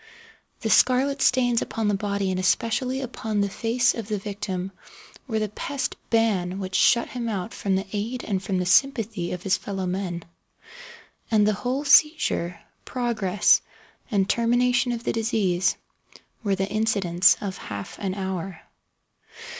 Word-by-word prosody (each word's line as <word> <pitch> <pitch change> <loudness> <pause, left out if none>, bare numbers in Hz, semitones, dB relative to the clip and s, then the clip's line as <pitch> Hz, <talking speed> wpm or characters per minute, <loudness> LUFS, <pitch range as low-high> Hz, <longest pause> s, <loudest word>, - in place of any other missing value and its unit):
The - - -1
scarlet 270 +2 +3
stains 245 -2 +3
upon 225 -2 -2
the 205 - +2
body 200 -1 -1
and 185 - -1
especially 250 +7 0
upon 220 -4 -2
the 200 - 0
face 235 +4 +1
of 225 -3 -6
the 215 -1 -1
victim, 195 -2 -4 0.6
were 220 -4 -1
the 215 0 0
pest 270 +7 -4
ban 200 -6 +1
which 190 -1 -5
shut 235 +4 +4
him 240 -2 -4
out 200 0 -4
from 195 -1 -1
the 190 +1 -1
aid 225 +5 -3
and 195 -3 -2
from 190 -1 -2
the 180 - -1
sympathy 215 -3 +2
of 180 0 -5
his 195 0 +2
fellow 195 -2 -4
men. 180 -2 -3 1.1
And 215 -2 +4
the 215 - +3
whole 255 +7 -2
seizure, 280 - +3 0.2
progress 220 -6 +2 0.5
and 200 -5 +1
termination 245 +2 +2
of 235 -1 -4
the - - -1
disease, 195 -5 +1 0.7
were 200 -2 +1
the 195 0 -1
incidents 200 -5 +3
of 195 -2 -5
half 100 -2 -7
an 190 -2 -2
hour. 190 -3 -4
205 Hz, 155 wpm, -25 LUFS, 190-235 Hz, 1.1 s, shut